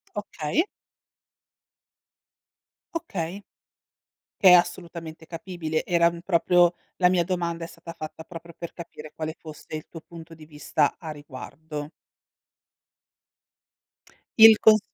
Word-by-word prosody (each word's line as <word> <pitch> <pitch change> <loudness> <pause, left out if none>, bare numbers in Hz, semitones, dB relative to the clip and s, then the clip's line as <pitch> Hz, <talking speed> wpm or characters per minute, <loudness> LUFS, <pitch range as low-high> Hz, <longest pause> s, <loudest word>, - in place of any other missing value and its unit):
Okay. 205 - -1 2.3
Okay. 200 - -4 0.9
Che 190 - +7
è - - +10
assolutamente 170 -2 0
capibile. 165 -2 -4
Era, 170 -1 +4
mhmm, 170 0 -9
proprio 175 -1 +4 0.2
la 180 -1 +5
mia 180 -2 +3
domanda 170 -2 -2
è - - -5
stata 165 0 -11
fatta 155 +1 -8
proprio 170 0 -11
per 170 - -7
capire 155 -3 -10
quale 155 0 -5
fosse 155 -1 -10
il 155 - -7
tuo 165 - -10
punto 165 0 -12
di 155 -1 -13
vista 150 -1 0
a 160 -3 -7
riguardo. 150 +1 -8 2.5
Il 220 -1 +10
cons 215 0 +7
170 Hz, 115 wpm, -25 LUFS, 160-180 Hz, 2.5 s, è